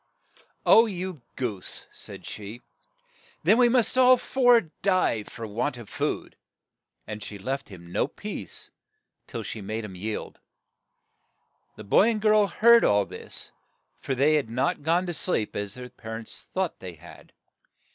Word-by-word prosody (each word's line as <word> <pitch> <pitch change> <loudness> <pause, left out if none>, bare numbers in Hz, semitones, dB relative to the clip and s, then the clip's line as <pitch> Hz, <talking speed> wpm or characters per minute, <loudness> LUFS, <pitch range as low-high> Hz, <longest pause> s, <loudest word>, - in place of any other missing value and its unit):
' - - -29
' - - -45
Oh, 230 +1 +7
you 185 - -5
goose! 110 -8 -3
' - - -37
' - - -36
said - - -9
she; 105 +3 -8 0.3
' - - -40
' - - -30
then 225 - +5
we 245 -1 +6
must 250 +1 +2
all 255 0 +7
four 245 -2 +4 0.2
die 185 - +2
for 115 - -8
want 120 +6 -2
of 115 -4 -10
food." - - -3 0.7
And 105 -1 -6
she 105 0 -7
left 135 +8 -4
him 85 -3 -12
no - - +1
peace - - -8 0.6
till - - -5
she 110 - -6
made 110 +3 -4
him 100 - -8
yield. 105 +4 -5 1.4
The 110 - -9
boy 190 - +5
and 225 -2 0
girl 215 -1 +4
heard 235 +3 +6
all 100 -1 +4
this, - - -9 0.5
for 135 - -2
they 140 +4 +4
had 145 -7 +1
not 125 +5 0
gone 170 +5 +2
to 175 - -3
sleep, 150 - -1
as 100 -1 -4
their 125 0 -8
par 110 -1 -7
ents 115 - -10
thought 185 -2 -2
they 90 -2 -7
had. 85 +3 -15
130 Hz, 175 wpm, -26 LUFS, -, 1.4 s, Oh